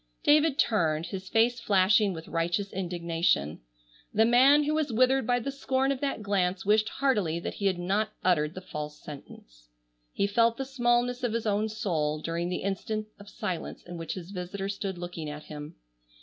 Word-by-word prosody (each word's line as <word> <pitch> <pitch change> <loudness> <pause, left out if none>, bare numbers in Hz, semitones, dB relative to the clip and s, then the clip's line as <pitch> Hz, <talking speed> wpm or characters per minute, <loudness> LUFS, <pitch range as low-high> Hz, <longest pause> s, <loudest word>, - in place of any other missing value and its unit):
David 300 -2 +4
turned, 165 -7 +2
his 185 +2 -6
face 235 +2 +3
flashing 205 0 +3
with 165 -2 -7
righteous 175 +4 -1
indignation. 170 - 0 0.5
The 220 +2 +4
man 265 +5 +6
who 300 +1 0
was 310 -4 0
withered 255 +2 +3
by 245 0 +3
the 275 +4 -3
scorn 270 0 0
of 270 - -2
that 275 -6 -2
glance 190 -2 0
wished 215 +1 +3
heartily 205 -12 0
that - - -4
he 200 - -1
had 185 -2 +1
not 195 +4 0
uttered 160 -3 +2
the 185 - -6
false 150 -3 -6
sentence. - - -12 0.4
He - - 0
felt 230 +3 +2
the 270 - -3
smallness 245 -1 +1
of 245 -3 -1
his 230 -1 -2
own 210 +1 +1
soul, 155 -8 -1
during 170 +2 -2
the 180 - -3
instant 215 +2 -3
of 205 0 -12
silence 195 -8 -5
in 175 - -9
which 165 - -4
his 185 0 -8
visitor 195 +1 -4
stood 195 -2 -4
looking 175 -3 -6
at 150 +1 -7
him. 150 0 -9
200 Hz, 185 wpm, -28 LUFS, 170-235 Hz, 0.5 s, man